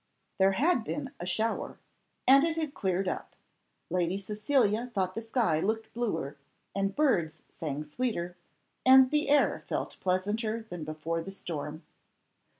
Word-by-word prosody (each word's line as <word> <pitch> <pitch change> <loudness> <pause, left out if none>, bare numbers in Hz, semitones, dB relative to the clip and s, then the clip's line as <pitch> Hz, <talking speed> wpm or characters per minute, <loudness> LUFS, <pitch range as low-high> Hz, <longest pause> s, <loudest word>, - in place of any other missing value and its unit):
There 190 0 +5
had 275 - +2
been 275 +2 -4
a 175 - -5
shower, 220 +4 -1 0.5
and 275 +2 +8
it 330 0 0
had 310 -3 -2
cleared 190 -4 0
up. - - -4 0.6
Lady 180 +1 +1
Cecilia 215 +3 +1
thought 185 -2 0
the 225 - -4
sky 225 -8 +1
looked 220 +5 -2
bluer, 165 - -2 0.4
and 195 0 -1
birds 170 - +1
sang 150 -2 -4
sweeter, 180 0 -2 0.5
and 260 0 +8
the 300 -1 +1
air 290 0 +3
felt - - -3
pleasanter 215 +5 0
than 175 -3 -5
before 155 +2 -3
the 165 - -7
storm. 155 -4 -5
200 Hz, 145 wpm, -30 LUFS, 175-250 Hz, 0.6 s, and